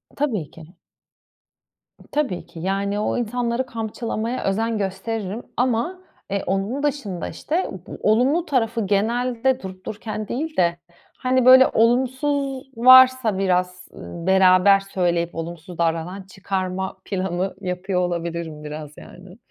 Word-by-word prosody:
Tabii 220 Hz, -, -2 dB
ki. 165 Hz, +3 st, -14 dB, 1.4 s
Tabii 280 Hz, -12 st, -1 dB
ki, 165 Hz, -, -12 dB
yani, 200 Hz, +3 st, -1 dB
o 210 Hz, -, -1 dB
insanları 240 Hz, +1 st, -1 dB
kamçılamaya 230 Hz, 0 st, -4 dB
özen 225 Hz, +3 st, 0 dB
gösteririm 200 Hz, +2 st, -3 dB
ama, 250 Hz, +9 st, 0 dB, 0.3 s
eee, 200 Hz, 0 st, -1 dB
onun 195 Hz, +9 st, -1 dB
dışında, 245 Hz, -, -2 dB
işte, 340 Hz, +5 st, -2 dB
u 190 Hz, -, -8 dB
bu -, -, -8 dB
olumlu 255 Hz, +10 st, +3 dB
tarafı 230 Hz, -, 0 dB
genelde 240 Hz, +5 st, +1 dB
durup 185 Hz, -1 st, -9 dB
dururken 215 Hz, 0 st, -5 dB
değil 310 Hz, +5 st, -4 dB
de, 170 Hz, -1 st, +2 dB, 0.4 s
hani, 255 Hz, -1 st, +1 dB
böyle, 260 Hz, +1 st, +9 dB
olumsuz 260 Hz, +3 st, +1 dB
varsa 255 Hz, -3 st, +7 dB
biraz, 180 Hz, -1 st, 0 dB
ııı, 170 Hz, +1 st, -8 dB
beraber 190 Hz, +1 st, +6 dB
söyleyip 175 Hz, -3 st, -1 dB
olumsuz 165 Hz, +1 st, -7 dB
davranan 170 Hz, +3 st, -1 dB
çıkarma 190 Hz, 0 st, -4 dB
planı 190 Hz, -1 st, -2 dB
yapıyor 180 Hz, 0 st, -2 dB
olabilirim, 170 Hz, -3 st, -3 dB
biraz 150 Hz, 0 st, -7 dB
yani. 180 Hz, +3 st, -13 dB
200 Hz, 125 wpm, -22 LUFS, 180-245 Hz, 1.4 s, böyle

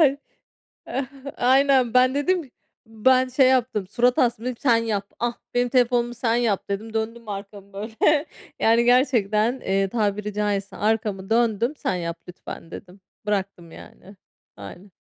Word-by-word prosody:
Ay 280 Hz, -3 st, +4 dB, 1.2 s
aynen, 260 Hz, -1 st, +3 dB
ben 255 Hz, +1 st, +4 dB
dedim, 305 Hz, 0 st, 0 dB, 0.4 s
ben 255 Hz, +4 st, +2 dB
şey 260 Hz, 0 st, +4 dB
yaptım, 245 Hz, -6 st, +1 dB
surat 245 Hz, +5 st, +1 dB
astım. 235 Hz, -2 st, +1 dB
Dedim 250 Hz, 0 st, -2 dB
ki, -, -, -28 dB
"Sen 245 Hz, -4 st, +4 dB
yap, 215 Hz, -3 st, -2 dB
ah, 240 Hz, 0 st, -2 dB, 0.2 s
benim 245 Hz, 0 st, +2 dB
telefonumu, 240 Hz, -1 st, +1 dB
sen 235 Hz, -1 st, 0 dB
yap." 230 Hz, -5 st, 0 dB
dedim. 220 Hz, +3 st, -4 dB
Döndüm 225 Hz, 0 st, -4 dB
arkamı 200 Hz, 0 st, -8 dB
böyle, 225 Hz, +9 st, 0 dB, 0.3 s
yani, 230 Hz, +1 st, +4 dB
gerçekten, 240 Hz, -2 st, +2 dB
eee, 195 Hz, -2 st, 0 dB
tabiri 210 Hz, -1 st, -1 dB
caizse 205 Hz, -1 st, -2 dB
arkamı 210 Hz, -3 st, -1 dB
döndüm. 230 Hz, +2 st, +1 dB
"Sen -, -, -2 dB
yap 170 Hz, -1 st, -4 dB
lütfen." 175 Hz, -1 st, -10 dB
dedim, 185 Hz, +1 st, -11 dB, 0.3 s
bıraktım, 190 Hz, -5 st, -3 dB
yani. 195 Hz, +3 st, -14 dB, 0.4 s
Aynen. 175 Hz, -, -11 dB
225 Hz, 145 wpm, -23 LUFS, 200-250 Hz, 1.2 s, Ay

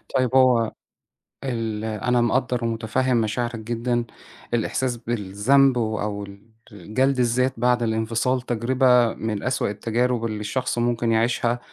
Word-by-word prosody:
طيب، 130 Hz, 0 st, +1 dB
هو 125 Hz, -4 st, +4 dB, 0.7 s
ال 115 Hz, -4 st, -3 dB
أنا 120 Hz, +3 st, 0 dB
مقدر 125 Hz, 0 st, 0 dB
ومُتفهم 115 Hz, +3 st, 0 dB
مشاعرك 115 Hz, +2 st, -1 dB
جدًا. 120 Hz, +1 st, -2 dB, 0.5 s
الإحساس 120 Hz, +2 st, -1 dB
بالذنب 120 Hz, +4 st, +2 dB
و 110 Hz, -2 st, -1 dB
أو 105 Hz, -1 st, -3 dB
ال 100 Hz, +3 st, -13 dB, 0.2 s
جلد 125 Hz, +8 st, -1 dB
الذات 125 Hz, +2 st, +2 dB
بعد 125 Hz, 0 st, +2 dB
الانفصال، 115 Hz, +3 st, 0 dB
تجربة 125 Hz, 0 st, +2 dB
من 110 Hz, -2 st, -4 dB
أسوأ 130 Hz, -4 st, 0 dB
التجارب 115 Hz, +3 st, -1 dB
اللي 110 Hz, -2 st, -3 dB
الشخص 125 Hz, +4 st, -2 dB
ممكن 120 Hz, -1 st, 0 dB
يعيشها، 120 Hz, +1 st, +1 dB
120 Hz, 130 wpm, -23 LUFS, 110-125 Hz, 0.7 s, هو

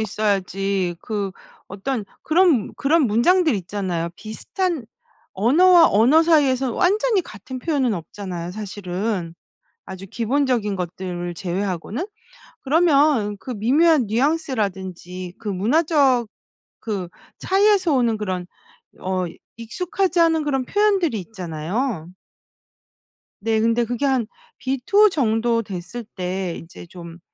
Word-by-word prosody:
있어야지 195 Hz, -3 st, -1 dB
그 205 Hz, -4 st, -3 dB, 0.4 s
어떤 210 Hz, +4 st, -3 dB, 0.2 s
그런 325 Hz, -, +3 dB
그런 315 Hz, +4 st, +3 dB
문장들이 305 Hz, -, +3 dB
있잖아요. 180 Hz, -3 st, -3 dB
비슷한 310 Hz, -, -3 dB, 0.5 s
언어와 330 Hz, -, +5 dB
언어 255 Hz, +10 st, +5 dB
사이에서 270 Hz, -6 st, +3 dB
완전히 410 Hz, +2 st, +2 dB
같은 255 Hz, -, -9 dB
표현은 265 Hz, -5 st, 0 dB
없잖아요, 175 Hz, 0 st, -6 dB
사실은. 195 Hz, -3 st, -4 dB, 0.5 s
아주 190 Hz, 0 st, -8 dB
기본적인 240 Hz, -3 st, 0 dB
것들을 175 Hz, -1 st, -4 dB
제외하고는. 190 Hz, -, -3 dB, 0.6 s
그러면 285 Hz, -8 st, +3 dB
그 255 Hz, -, -9 dB
미묘한 270 Hz, +5 st, +3 dB
뉘앙스라든지 195 Hz, -, -2 dB
그 220 Hz, -, -7 dB
문화적 260 Hz, -, +2 dB, 0.5 s
그 200 Hz, -6 st, -4 dB, 0.3 s
차이에서 390 Hz, -3 st, +3 dB
오는 235 Hz, -4 st, +2 dB
그런 185 Hz, -4 st, -3 dB, 0.5 s
어 185 Hz, -1 st, -1 dB, 0.3 s
익숙하지 355 Hz, -, -1 dB
않은 325 Hz, -2 st, +3 dB
그런 270 Hz, -3 st, -1 dB
표현들이 390 Hz, -, +1 dB
있잖아요. 180 Hz, -, -4 dB, 1.3 s
네. 220 Hz, +1 st, +1 dB
근데 230 Hz, +1 st, +2 dB
그게 245 Hz, +4 st, -2 dB
한 260 Hz, -4 st, +1 dB, 0.3 s
B 265 Hz, 0 st, -2 dB
2? 420 Hz, 0 st, +6 dB
정도 230 Hz, -5 st, +1 dB
됐을 200 Hz, +4 st, -7 dB
때 185 Hz, -1 st, -3 dB
'이제 165 Hz, +1 st, -11 dB
좀 170 Hz, -1 st, -11 dB
225 Hz, 260 characters per minute, -22 LUFS, 190-295 Hz, 1.3 s, 2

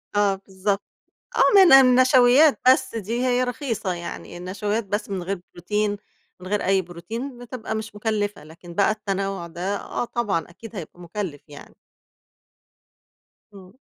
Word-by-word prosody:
آه 205 Hz, -1 st, +3 dB
بالضبط، 195 Hz, +1 st, -2 dB, 0.5 s
آه، -, -, +3 dB
من 380 Hz, -5 st, +8 dB
النشويات 255 Hz, +2 st, +6 dB
بس 260 Hz, -2 st, +3 dB
دي 230 Hz, +4 st, -2 dB
هي 250 Hz, 0 st, +2 dB
رخيصة 245 Hz, -6 st, -2 dB
يعني، 170 Hz, 0 st, -7 dB
النشويات 205 Hz, +5 st, -2 dB
بس 205 Hz, +2 st, -3 dB
من 190 Hz, -3 st, -3 dB
غير 195 Hz, +1 st, -3 dB
بروتين، 205 Hz, +4 st, -1 dB, 0.4 s
من 185 Hz, -, -10 dB
غير 205 Hz, +1 st, -1 dB
أي 190 Hz, 0 st, +3 dB
بروتين 220 Hz, +10 st, -7 dB
بتبقى 245 Hz, -2 st, -6 dB
مش 220 Hz, -1 st, -6 dB
مُكلِّفة، 210 Hz, -2 st, -2 dB
لكن 170 Hz, +3 st, -13 dB
بقى 200 Hz, +4 st, +3 dB
التنَوُع 195 Hz, -4 st, -3 dB
ده 175 Hz, +4 st, -3 dB
آه -, -, -4 dB
طبعًا، 205 Hz, -10 st, -2 dB
أكيد 225 Hz, +6 st, -12 dB
هيبقى 175 Hz, -2 st, -8 dB
مُكلِّف 175 Hz, -3 st, -5 dB
يعني. 145 Hz, 0 st, -13 dB, 1.8 s
إمم. 195 Hz, +4 st, -15 dB
205 Hz, 140 wpm, -23 LUFS, 185-235 Hz, 1.8 s, من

